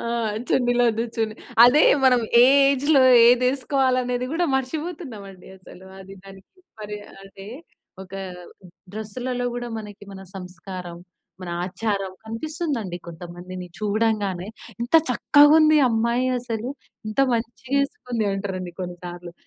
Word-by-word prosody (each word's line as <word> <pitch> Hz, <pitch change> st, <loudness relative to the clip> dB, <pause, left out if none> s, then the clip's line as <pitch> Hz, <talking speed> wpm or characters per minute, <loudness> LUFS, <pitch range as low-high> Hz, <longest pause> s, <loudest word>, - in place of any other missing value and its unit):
ఆ! -, -, -7 dB, 0.5 s
చున్నిలొద్దు 245 Hz, -2 st, +2 dB
చున్నీ 220 Hz, -1 st, -1 dB, 0.3 s
అదే 270 Hz, +6 st, +6 dB, 0.2 s
మనం 250 Hz, -2 st, +5 dB, 0.2 s
ఏ -, -, +8 dB, 0.2 s
ఏజ్‌లో 280 Hz, +1 st, +3 dB, 0.3 s
ఏది 250 Hz, +1 st, +4 dB
వేసుకోవాలి 265 Hz, -1 st, +1 dB
అనేది 250 Hz, 0 st, -2 dB
కూడా 345 Hz, +2 st, 0 dB
మర్చిపోతున్నాం 280 Hz, -, -4 dB
అండి. 185 Hz, -2 st, -15 dB
అసలు. 185 Hz, 0 st, -15 dB, 0.2 s
అది 195 Hz, 0 st, -11 dB
దానికి 195 Hz, -, -16 dB, 0.2 s
మరి 210 Hz, 0 st, -6 dB, 0.3 s
అదే 195 Hz, 0 st, -12 dB, 0.5 s
ఒక 190 Hz, 0 st, -12 dB, 0.8 s
డ్రెస్‌లలో 245 Hz, +4 st, -4 dB
కూడా 240 Hz, 0 st, -5 dB
మనకి 205 Hz, -1 st, -10 dB
మన 190 Hz, -, -10 dB
సంస్కారం, 180 Hz, -1 st, -8 dB, 0.4 s
మన 175 Hz, -, -6 dB
ఆచారం 195 Hz, 0 st, -3 dB
కనిపిస్తుందండి. 230 Hz, -, -4 dB
కొంతమందిని 175 Hz, +2 st, -9 dB
చూడంగానే, 210 Hz, -3 st, -1 dB, 0.3 s
"ఇంత 240 Hz, +6 st, -6 dB, 0.2 s
చక్కగా 290 Hz, +3 st, +5 dB
ఉంది. 310 Hz, -1 st, +5 dB
అమ్మాయి 235 Hz, +2 st, 0 dB
అసలు 235 Hz, -1 st, -5 dB, 0.4 s
ఇంత 215 Hz, -, -8 dB, 0.2 s
మంచిగా 235 Hz, +3 st, -4 dB
వేసుకుంది" 250 Hz, -, -3 dB
అంటారండి. 190 Hz, -2 st, -5 dB
కొన్నిసార్లు 175 Hz, -1 st, -7 dB
225 Hz, 120 wpm, -23 LUFS, 190-255 Hz, 0.8 s, ఏ